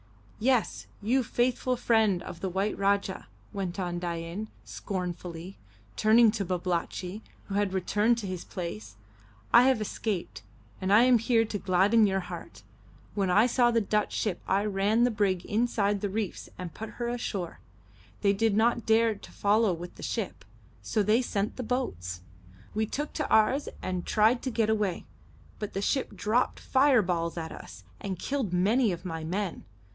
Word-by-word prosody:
"Yes, 250 Hz, 0 st, +1 dB, 0.2 s
you 250 Hz, +5 st, +3 dB
faithful 250 Hz, +1 st, 0 dB
friend 220 Hz, -7 st, +2 dB
of 170 Hz, -, -8 dB
the 190 Hz, +1 st, -2 dB
white 195 Hz, +3 st, -1 dB
Rajah," 200 Hz, -1 st, 0 dB, 0.3 s
went 195 Hz, -2 st, -3 dB
on 175 Hz, -2 st, -2 dB
Dain, 170 Hz, +4 st, -4 dB, 0.2 s
scornfully, 180 Hz, -1 st, -5 dB, 0.4 s
turning 220 Hz, +1 st, +5 dB
to 210 Hz, -2 st, -2 dB
Babalatchi, 180 Hz, +2 st, -2 dB, 0.2 s
who 195 Hz, -, -7 dB
had 200 Hz, -1 st, +1 dB
returned 210 Hz, +5 st, +2 dB
to 225 Hz, -, -4 dB
his 185 Hz, -2 st, -4 dB
place, 110 Hz, -, -6 dB, 0.6 s
"I 235 Hz, -, +9 dB
have 260 Hz, -4 st, +3 dB
escaped, 210 Hz, -, -3 dB, 0.4 s
and 190 Hz, +1 st, 0 dB
I 215 Hz, +3 st, +7 dB
am 250 Hz, -2 st, +5 dB
here 230 Hz, 0 st, +3 dB
to 210 Hz, -1 st, -4 dB
gladden 195 Hz, +5 st, +4 dB
your 195 Hz, 0 st, 0 dB
heart. 180 Hz, -, -9 dB, 0.5 s
When 195 Hz, -3 st, 0 dB
I 210 Hz, +5 st, +5 dB
saw 245 Hz, 0 st, +3 dB
the 230 Hz, -1 st, +3 dB
Dutch 210 Hz, +1 st, 0 dB
ship 205 Hz, -5 st, -1 dB
I 200 Hz, +2 st, +2 dB
ran 210 Hz, +3 st, +2 dB
the 245 Hz, -, +3 dB
brig 195 Hz, -4 st, 0 dB
inside 210 Hz, -2 st, +1 dB
the 205 Hz, -, -1 dB
reefs 205 Hz, -2 st, -4 dB
and 180 Hz, -3 st, -6 dB
put 220 Hz, 0 st, -7 dB
her 240 Hz, -, -2 dB
ashore. 205 Hz, -7 st, -3 dB, 0.6 s
They 200 Hz, -1 st, +4 dB
did 210 Hz, 0 st, +1 dB
not 235 Hz, +1 st, +2 dB
dare 225 Hz, 0 st, +4 dB
to 200 Hz, -, -13 dB
follow 210 Hz, +1 st, +2 dB
with 175 Hz, +1 st, -6 dB
the -, -, -13 dB
ship, 215 Hz, -, -3 dB, 0.4 s
so 110 Hz, -, 0 dB
they 215 Hz, +5 st, +3 dB
sent 210 Hz, -4 st, -2 dB
the -, -, -3 dB
boats. 90 Hz, -, -3 dB, 0.5 s
We 220 Hz, +1 st, 0 dB
took 295 Hz, +7 st, -4 dB
to 300 Hz, -, -2 dB
ours 235 Hz, +6 st, +3 dB
and 185 Hz, -1 st, -3 dB
tried 220 Hz, +3 st, +3 dB
to 260 Hz, -, -2 dB
get 225 Hz, -2 st, +1 dB
away, 205 Hz, -5 st, -1 dB, 0.5 s
but 210 Hz, -, -5 dB
the 195 Hz, -, -2 dB
ship 270 Hz, +5 st, 0 dB
dropped 225 Hz, +4 st, 0 dB
fireballs 190 Hz, -12 st, +2 dB
at 160 Hz, -1 st, -4 dB
us, 95 Hz, -2 st, -10 dB, 0.2 s
and 190 Hz, -2 st, -4 dB
killed 265 Hz, -2 st, -2 dB
many 210 Hz, +6 st, +3 dB
of 175 Hz, +1 st, -6 dB
my 165 Hz, -2 st, -4 dB
men. 185 Hz, +3 st, -3 dB
205 Hz, 170 wpm, -28 LUFS, 180-225 Hz, 0.6 s, I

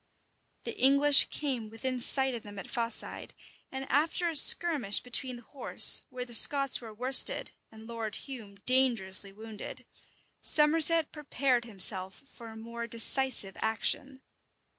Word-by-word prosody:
The -, -, -9 dB
English 280 Hz, +2 st, +3 dB
came 255 Hz, -7 st, -7 dB
within 250 Hz, +3 st, -7 dB
sight 265 Hz, +2 st, +4 dB
of 235 Hz, -, -9 dB
them 205 Hz, -1 st, -15 dB
at 195 Hz, -, -10 dB
Faside; 230 Hz, -2 st, -8 dB, 0.4 s
and 265 Hz, 0 st, -9 dB
after 320 Hz, +5 st, -3 dB
a 335 Hz, -, -5 dB
skirmish 295 Hz, -, +4 dB
between 250 Hz, +1 st, -6 dB
the 240 Hz, -, -16 dB
horse, 275 Hz, +4 st, +2 dB
where 250 Hz, -1 st, -9 dB
the 240 Hz, -, -10 dB
Scots 275 Hz, +3 st, +3 dB
were 225 Hz, -2 st, -13 dB
worsted, 250 Hz, +5 st, +1 dB, 0.2 s
and 220 Hz, 0 st, -17 dB
Lord 225 Hz, -2 st, -9 dB
Hume 225 Hz, -8 st, -12 dB
dangerously 230 Hz, -7 st, -1 dB
wounded, 215 Hz, +1 st, -13 dB, 0.6 s
Somerset 320 Hz, +1 st, +2 dB
prepared 275 Hz, -5 st, -4 dB
himself 190 Hz, -2 st, +1 dB
for 235 Hz, -, -15 dB
a 220 Hz, -, -14 dB
more 235 Hz, +1 st, -10 dB
decisive 235 Hz, -2 st, 0 dB
action. 260 Hz, +4 st, -4 dB
245 Hz, 140 wpm, -26 LUFS, 220-275 Hz, 0.6 s, sight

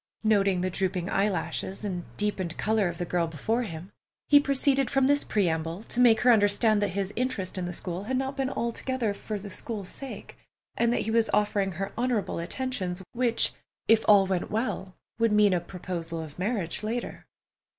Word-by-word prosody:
Noting 200 Hz, -4 st, +3 dB
the 185 Hz, 0 st, -1 dB
drooping 185 Hz, 0 st, -2 dB
eyelashes, 195 Hz, 0 st, -1 dB
and 180 Hz, -4 st, -3 dB
deepened 190 Hz, -5 st, -2 dB
color 215 Hz, -2 st, +1 dB
of 170 Hz, -, -6 dB
the 175 Hz, -, -2 dB
girl 170 Hz, -1 st, 0 dB
before 190 Hz, -, -1 dB
him, 180 Hz, -4 st, -7 dB, 0.4 s
he 290 Hz, -, +8 dB
proceeded 275 Hz, -1 st, +2 dB
from 270 Hz, -1 st, +2 dB
this 285 Hz, +1 st, +3 dB
preamble 165 Hz, -1 st, -1 dB
to 240 Hz, -, -2 dB
make 235 Hz, -3 st, +6 dB
her 250 Hz, -, +6 dB
understand 210 Hz, 0 st, +3 dB
that 205 Hz, -, +2 dB
his 195 Hz, 0 st, -2 dB
interest 225 Hz, -7 st, -2 dB
in 185 Hz, -2 st, -2 dB
the -, -, -4 dB
school 180 Hz, +2 st, -4 dB
had 260 Hz, +3 st, -1 dB
not 265 Hz, +1 st, -2 dB
been 270 Hz, -1 st, -1 dB
altogether 235 Hz, -2 st, -1 dB
for 210 Hz, +1 st, -5 dB
the 200 Hz, 0 st, -9 dB
school's 200 Hz, -1 st, -5 dB
sake, 275 Hz, -1 st, -8 dB, 0.4 s
and 235 Hz, 0 st, +2 dB
that -, -, +1 dB
he 220 Hz, -, -2 dB
was 225 Hz, 0 st, +2 dB
offering 205 Hz, -2 st, +1 dB
her 195 Hz, +3 st, -4 dB
honorable 240 Hz, -8 st, 0 dB
attentions, 190 Hz, -1 st, -3 dB
which, 240 Hz, -1 st, +1 dB, 0.3 s
if 225 Hz, 0 st, +5 dB
all 205 Hz, -2 st, +7 dB
went 185 Hz, -2 st, -1 dB
well, 210 Hz, -4 st, -2 dB, 0.2 s
would 230 Hz, -1 st, +3 dB
mean 210 Hz, -2 st, +5 dB
a 175 Hz, -, +1 dB
proposal 170 Hz, -2 st, -5 dB
of 160 Hz, 0 st, -8 dB
marriage 190 Hz, -4 st, -1 dB
later. 230 Hz, +3 st, -4 dB
205 Hz, 185 wpm, -27 LUFS, 185-235 Hz, 0.4 s, he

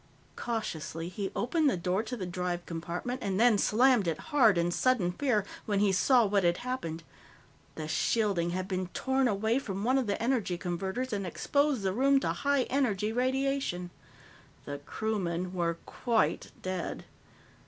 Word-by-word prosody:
Cautiously, 170 Hz, -8 st, -4 dB
he 195 Hz, +1 st, -4 dB
opened 300 Hz, +5 st, +2 dB
the 220 Hz, -, 0 dB
door 180 Hz, +3 st, 0 dB
to 250 Hz, +2 st, -5 dB
the 190 Hz, -, -4 dB
drive 180 Hz, 0 st, -3 dB
compartment 175 Hz, +10 st, -4 dB
and 195 Hz, 0 st, -1 dB
then 230 Hz, -3 st, +5 dB
slammed 240 Hz, -2 st, +4 dB
it 165 Hz, -2 st, 0 dB, 0.2 s
hard 225 Hz, -10 st, +5 dB
in 170 Hz, +1 st, +1 dB
sudden 215 Hz, -4 st, +2 dB
fear 215 Hz, -1 st, 0 dB, 0.2 s
when 205 Hz, -2 st, +1 dB
he 205 Hz, -1 st, +3 dB
saw 240 Hz, +5 st, +4 dB
what 200 Hz, -1 st, +2 dB
had 175 Hz, 0 st, +3 dB
happened. 170 Hz, -11 st, -4 dB, 0.7 s
The 155 Hz, -1 st, -5 dB
shielding 190 Hz, +1 st, +1 dB
had 185 Hz, +1 st, -3 dB
been 185 Hz, -2 st, -2 dB
torn 265 Hz, -1 st, +1 dB
away 220 Hz, +3 st, +1 dB
from 195 Hz, -6 st, -4 dB
one 260 Hz, +4 st, +3 dB
of 250 Hz, -, -2 dB
the 200 Hz, -, -1 dB
energy 230 Hz, -7 st, 0 dB
converters 190 Hz, +8 st, -3 dB
and 200 Hz, -1 st, -1 dB
exposed 285 Hz, -, +1 dB
the 190 Hz, -1 st, 0 dB
room 275 Hz, +5 st, +4 dB
to -, -, 0 dB
high 280 Hz, -2 st, +1 dB
energy 220 Hz, -7 st, 0 dB
radiation. 260 Hz, -7 st, 0 dB, 0.7 s
The 145 Hz, 0 st, -5 dB
crewmen 185 Hz, 0 st, -2 dB
were 170 Hz, -2 st, -1 dB
quite 220 Hz, -10 st, 0 dB
dead. 185 Hz, -3 st, -4 dB
205 Hz, 165 wpm, -30 LUFS, 180-250 Hz, 0.7 s, then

